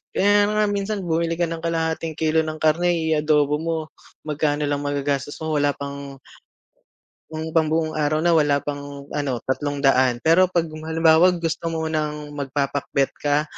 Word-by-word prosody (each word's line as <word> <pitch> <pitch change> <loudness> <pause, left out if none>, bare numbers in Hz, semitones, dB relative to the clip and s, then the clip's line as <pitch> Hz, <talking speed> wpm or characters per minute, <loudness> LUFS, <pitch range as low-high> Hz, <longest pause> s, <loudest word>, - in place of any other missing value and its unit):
Kaya 205 +1 +4
nga 210 0 +1
minsan 200 0 -2
bumili 165 0 0
ka 175 - -1
ng 165 -1 -4
kalahating 160 -1 -2
kilo 160 0 +1
ng 155 0 -4
karne 175 +3 +3
i-adobo 150 -2 +1
mo, 165 0 -2 0.5
magkano 150 -1 -1
lang 145 0 0
magagastos 145 0 -2
mo 160 - -2
wala 145 0 +1
pang 140 -1 -7 1.1
yung 160 +1 -5
pambuong 160 0 +1
araw 155 +1 0
na 175 - +3
wala 145 -3 +3
pang 145 -1 -6
ano 135 -5 -2
₱300, 130 -3 +1
pero 175 +4 +5
'pag 175 -2 +1
halimbawa 160 +2 +3
gusto 165 0 -3
mo 165 -1 -2
ng 150 -1 -3
magpapakbet 140 -1 -1
ka, 145 0 +1
155 Hz, 150 wpm, -22 LUFS, 145-165 Hz, 1.1 s, pero